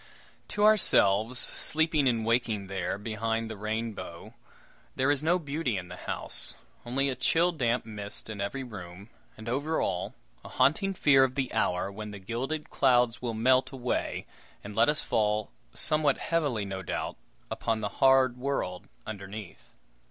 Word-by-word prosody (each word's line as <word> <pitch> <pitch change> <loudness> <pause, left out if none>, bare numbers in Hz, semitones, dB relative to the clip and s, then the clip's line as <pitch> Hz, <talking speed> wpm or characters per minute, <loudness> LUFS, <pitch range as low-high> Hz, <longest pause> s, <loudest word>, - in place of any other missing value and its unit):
To 205 - -1
ourselves, 115 - +4
sleeping 155 +1 +2
and 115 -2 -1
waking 115 -3 0
there, 95 -1 -3
behind 115 +1 -2
the - - -5
rainbow, 110 -2 -5 0.6
there 130 +2 +2
is 145 -1 +1
no 165 +3 +3
beauty 145 - -2
in 90 -1 -6
the - - -7
house; - - -1 0.3
only 135 +3 0
a 135 - -1
chill 165 +7 +2
damp 125 -7 0
mist 105 -2 -2
in 105 -3 -6
every 130 +7 -3
room, 100 -3 -10 0.3
and, 110 +1 -10
over 145 +6 -1
all, 90 -1 -2 0.3
a - - -10
haunting 165 +10 +2
fear 135 -5 +5
of 130 -1 0
the 135 -2 -2
hour 90 +2 0
when 105 +1 -7
the 105 - -8
gilded 125 +10 -4
clouds 125 -3 +3
will 120 -2 -3
melt 130 +3 +3
away, 125 -2 -2 0.4
and 100 0 -8
let 115 +4 +4
us 150 - 0
fall 105 -1 0 0.2
somewhat 150 - +5
heavily, 145 -11 -1
no 95 -1 -5
doubt 95 - -4 0.4
upon 110 -1 -1
the 105 - -2
hard 130 -2 +5
world 125 -9 -3 0.2
underneath. 100 -2 -9
115 Hz, 160 wpm, -28 LUFS, 105-135 Hz, 0.6 s, fear